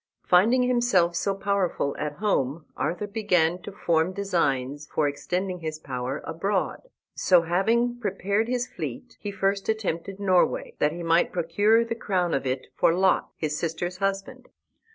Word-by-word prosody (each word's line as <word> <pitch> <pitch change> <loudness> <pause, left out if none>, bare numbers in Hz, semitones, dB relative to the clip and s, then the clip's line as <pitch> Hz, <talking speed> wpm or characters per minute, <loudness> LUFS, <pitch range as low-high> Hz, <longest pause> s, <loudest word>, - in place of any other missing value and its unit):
Finding 225 +8 +4
himself 240 -9 +2
so 195 +3 0
powerful 195 -7 0
at 150 -1 -2
home, 155 -5 -1
Arthur 180 +4 -2
began 185 -5 +1
to 205 - -8
form 170 -2 +1
designs 145 -8 -1
for 150 - +1
extending 180 +6 -3
his 155 -2 -4
power 130 -2 -4
abroad. 195 - -2 0.2
So, 180 -3 +4
having 230 +8 +1
prepared 200 0 -1
his 245 0 0
fleet, 250 -2 -7
he 205 - -5
first 195 0 -1
attempted 195 -3 -2
Norway, 205 - +2
that 150 - +3
he 170 +2 -6
might 165 +1 +3
procure 205 +7 +2
the 230 - -2
crown 185 -6 -1
of 135 - -1
it 130 0 -2
for - - +4
Lot, 190 +1 +2
his 150 -2 -2
sister's 175 +2 -3
husband. 195 0 -3
185 Hz, 155 wpm, -26 LUFS, 165-205 Hz, 0.2 s, Finding